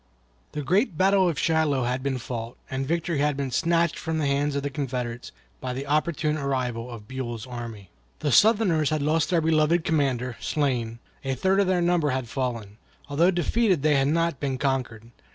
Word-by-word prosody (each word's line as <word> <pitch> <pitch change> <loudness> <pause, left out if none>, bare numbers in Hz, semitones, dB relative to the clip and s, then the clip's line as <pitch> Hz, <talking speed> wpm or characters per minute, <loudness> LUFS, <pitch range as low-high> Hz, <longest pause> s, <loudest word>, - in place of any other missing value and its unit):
The 150 - -3
great 185 - +1
battle 190 0 +4
of 160 - -3
Shiloh 155 -2 +1
had 125 +2 -1
been 135 -1 -1
fought, 120 -1 -6
and 135 0 -2
victory 170 -1 -1
had 145 -1 +1
been 140 -2 -2
snatched 170 +3 +1
from 160 -1 -2
the 155 - 0
hands 140 +1 0
of 140 - -1
the 140 - -2
Confederates 125 -3 -4 0.3
by 130 -1 -4
the 135 +2 -4
opportune 155 +1 0
arrival 125 -4 -2
of 115 -4 -9
Buell's 120 -3 -5
army. 115 -6 -8 0.3
The 145 - -1
Southerners 190 - +4
had 155 -2 -1
lost 155 +1 +1
their 170 -2 +2
beloved 160 +1 +2
commander, 130 -6 0
slain; 125 -6 -1 0.3
a 135 -1 -1
third 190 +8 +2
of 200 - +3
their 180 -2 +2
number 170 -3 +2
had 130 -2 -2
fallen. 115 -3 -4 0.3
Although 160 +5 +3
defeated 185 - +1
they 155 -1 +4
had 135 0 +3
not 165 -1 +1
been 135 -2 -2
conquered. 125 -4 -2
140 Hz, 190 wpm, -25 LUFS, 125-165 Hz, 0.3 s, battle